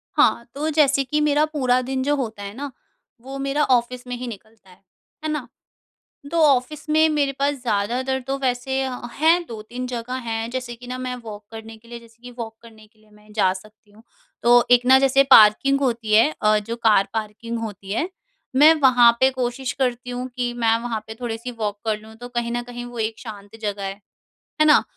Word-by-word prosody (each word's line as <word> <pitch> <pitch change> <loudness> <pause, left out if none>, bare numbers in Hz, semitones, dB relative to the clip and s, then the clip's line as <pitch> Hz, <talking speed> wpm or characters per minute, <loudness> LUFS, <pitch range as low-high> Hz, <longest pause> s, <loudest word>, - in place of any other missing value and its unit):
हाँ, 235 - +3
तो 305 +2 -2
जैसे 285 -3 +3
कि 300 +4 -1
मेरा 300 0 +3
पूरा 255 -5 +1
दिन 260 +1 -2
जो 290 +1 +1
होता 220 -7 -4
है 200 0 -7
ना, 285 +1 -6 0.5
वो 270 +2 -8
मेरा 275 +2 0
ऑफिस 250 -1 +1
में 245 - -4
ही 250 +1 -6
निकलता 220 -2 -12
है, 180 +1 -20 0.4
है 310 - -2
ना। 300 -4 -3 0.8
तो 335 - -1
ऑफिस 275 +3 0
में 315 +1 +4
मेरे 290 -3 +1
पास 285 +1 +2
ज़्यादातर 245 +4 -1
तो 275 0 -1
वैसे 265 +1 -1
अ, 255 -2 -4
हैं, 330 +3 +3
2-3 235 +1 -7
जगह 245 0 -5
हैं, 225 0 -2
जैसे 250 -1 -5
कि 245 +1 -13
ना 255 0 -4
मैं 255 0 -4
वॉक 210 -1 -9
करने 225 0 -9
के 230 +1 -22
लिए 235 0 -8
जैसे 230 0 -20
कि 245 - -9
वॉक 225 -1 -6
करने 220 -2 -16
के 215 0 -33
लिए 215 - -26
मैं 210 0 -20
जा 200 -3 +3
सकती 210 +2 -14
हूँ। 220 +2 -19 0.4
तो 240 0 +6
एक 245 0 +5
ना 265 +1 +7
जैसे 270 0 +4
पार्किंग 255 +6 +7
होती 235 -5 -1
है 225 +8 +6
अ, 215 0 +4
जो 225 +3 -5
कार 215 -4 +3
पार्किंग 225 +1 -4
होती 205 -3 -7
है, 310 - -1 0.5
मैं 305 +4 +8
वहाँ 245 -3 +7
पे 260 0 +5
कोशिश 255 0 -3
करती 245 -1 -1
हूँ 250 +1 -4
कि 245 -1 -2
मैं 230 -1 +2
वहाँ 230 -2 -3
पे 220 - -6
थोड़े-सी 235 +1 -4
वॉक 205 -1 -2
कर 215 -1 0
लूँ, 220 +1 -14
तो 245 +2 -9
कहीं 240 -1 -2
न 240 0 -1
कहीं 245 0 -8
वो 240 -1 -8
एक 220 0 -2
शांत 210 -2 -10
जगह 205 -1 -3
है, 195 0 -3 0.7
है - - +7
ना? 300 - +6
240 Hz, 215 wpm, -22 LUFS, 220-265 Hz, 0.8 s, मैं